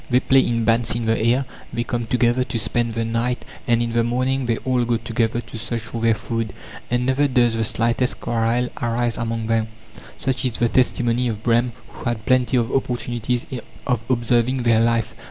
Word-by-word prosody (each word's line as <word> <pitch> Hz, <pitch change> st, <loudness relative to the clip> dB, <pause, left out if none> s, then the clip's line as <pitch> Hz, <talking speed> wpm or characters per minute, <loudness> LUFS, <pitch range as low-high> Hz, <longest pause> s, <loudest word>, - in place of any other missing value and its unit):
They 125 Hz, 0 st, +4 dB
play 135 Hz, +1 st, +4 dB
in 115 Hz, -3 st, +1 dB
bands 115 Hz, 0 st, +2 dB
in 120 Hz, -1 st, -2 dB
the 110 Hz, 0 st, +2 dB
air, 120 Hz, +4 st, +2 dB, 0.3 s
they 120 Hz, -, -1 dB
come 120 Hz, -1 st, -3 dB
together 125 Hz, +1 st, +2 dB
to 125 Hz, -1 st, -4 dB
spend 115 Hz, 0 st, -1 dB
the 115 Hz, 0 st, 0 dB
night, 115 Hz, +2 st, -1 dB, 0.2 s
and 120 Hz, -1 st, +3 dB
in 115 Hz, -, -2 dB
the 115 Hz, 0 st, +2 dB
morning 130 Hz, +2 st, 0 dB
they 115 Hz, -2 st, +1 dB
all 130 Hz, -2 st, +2 dB
go 120 Hz, 0 st, +1 dB
together 115 Hz, 0 st, -1 dB
to 115 Hz, -, -9 dB
search 115 Hz, 0 st, -3 dB
for 115 Hz, +1 st, -6 dB
their 115 Hz, -1 st, +3 dB
food, 115 Hz, -1 st, -3 dB, 0.4 s
and 120 Hz, 0 st, +1 dB
never 135 Hz, +3 st, +2 dB
does 120 Hz, -3 st, +3 dB
the 115 Hz, 0 st, 0 dB
slightest 115 Hz, +3 st, +1 dB
quarrel 120 Hz, +2 st, 0 dB
arise 120 Hz, 0 st, 0 dB
among 115 Hz, -1 st, -2 dB
them; 115 Hz, 0 st, +1 dB, 0.5 s
such 130 Hz, -1 st, -1 dB
is 125 Hz, -3 st, +1 dB
the 120 Hz, 0 st, +2 dB
testimony 125 Hz, -1 st, +2 dB
of 110 Hz, -2 st, -4 dB
Brehm, 120 Hz, 0 st, +2 dB, 0.2 s
who -, -, -11 dB
had 110 Hz, -2 st, -4 dB
plenty 130 Hz, 0 st, +3 dB
of 115 Hz, -2 st, 0 dB
opportunities 120 Hz, -2 st, -1 dB, 0.4 s
of 125 Hz, -4 st, +1 dB
observing 120 Hz, +1 st, +1 dB
their 115 Hz, -2 st, +4 dB
life. 115 Hz, -1 st, +1 dB
120 Hz, 200 wpm, -22 LUFS, 115-125 Hz, 0.5 s, They